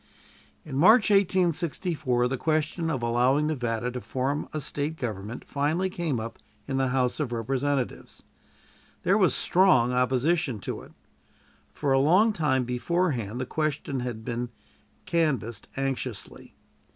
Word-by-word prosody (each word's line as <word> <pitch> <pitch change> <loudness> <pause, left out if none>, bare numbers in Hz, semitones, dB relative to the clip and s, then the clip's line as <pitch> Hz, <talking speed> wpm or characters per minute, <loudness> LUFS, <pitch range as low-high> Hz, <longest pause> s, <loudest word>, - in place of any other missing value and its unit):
In 135 -4 -5
March, 220 +6 +6
1864, 170 -8 +1
the 130 - -1
question 155 +3 -1
of 135 -6 -2
allowing 125 +5 +2
Nevada 125 -5 -1
to 125 0 -5
form 135 +4 -2
a 155 - -3
State 150 +1 -2
government 110 -2 -5
finally 160 +7 0
came 165 -9 -2
up 115 +1 -7 0.3
in 135 -1 -1
the 135 0 +2
House 125 +1 0
of 145 -5 -2
Representatives. 130 +3 -2 0.8
There - - +3
was - - +3
strong 170 -10 +4
opposition 130 +3 +1
to - - -4
it. - - -15 0.8
For 140 -2 0
a 135 - +4
long 185 +11 +4
time 140 -7 +1
beforehand 125 - -1
the 130 - -2
question 150 -2 -2
had 120 -3 -5
been 120 +1 -3 0.6
canvassed 135 - -1
anxiously. 135 -5 -4
135 Hz, 135 wpm, -27 LUFS, 125-160 Hz, 0.8 s, March